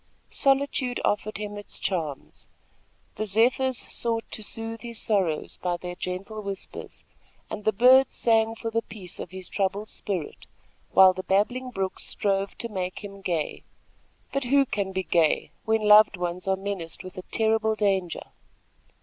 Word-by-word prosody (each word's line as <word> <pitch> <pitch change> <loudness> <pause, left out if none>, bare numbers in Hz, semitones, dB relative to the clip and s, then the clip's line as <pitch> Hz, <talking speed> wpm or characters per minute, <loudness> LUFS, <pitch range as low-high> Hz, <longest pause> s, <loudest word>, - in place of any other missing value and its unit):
Solitude 270 -2 +1
offered 210 0 0
him 205 0 -5
its 205 - -7
charms. 160 -7 -4 0.7
The 215 +1 -2
zephyrs 250 +5 +3
sought 230 -2 -1
to - - -5
soothe 225 +1 -4
his 235 -1 -6
sorrows 190 -8 0
by 175 -1 -1
their 175 0 -6
gentle 190 +4 -5
whispers, 200 -1 -7 0.5
and 210 - -5
the 215 - +4
birds 255 +5 +6
sang 225 -1 +3
for 225 0 -4
the 230 0 +1
peace 200 -5 -6
of - - -5
his 185 0 -7
troubled 200 +2 -1
spirit, 180 -7 -4 0.4
while 190 -1 +7
the 185 - -4
babbling 230 +7 +1
brooks 195 -5 -3
strove 195 -1 -1
to 235 - -2
make 185 -1 -4
him 200 -1 -9
gay; 170 -5 -2 0.7
but 275 -1 0
who 275 +2 +4
can 200 -5 -2
be 190 0 -1
gay 165 -4 +2
when 220 -1 +2
loved 210 -1 +7
ones 180 +1 -3
are 190 - +3
menaced 190 -4 -4
with 185 0 -9
a 185 - -5
terrible 220 0 +2
danger? 195 -5 -1
205 Hz, 160 wpm, -26 LUFS, 185-225 Hz, 0.7 s, while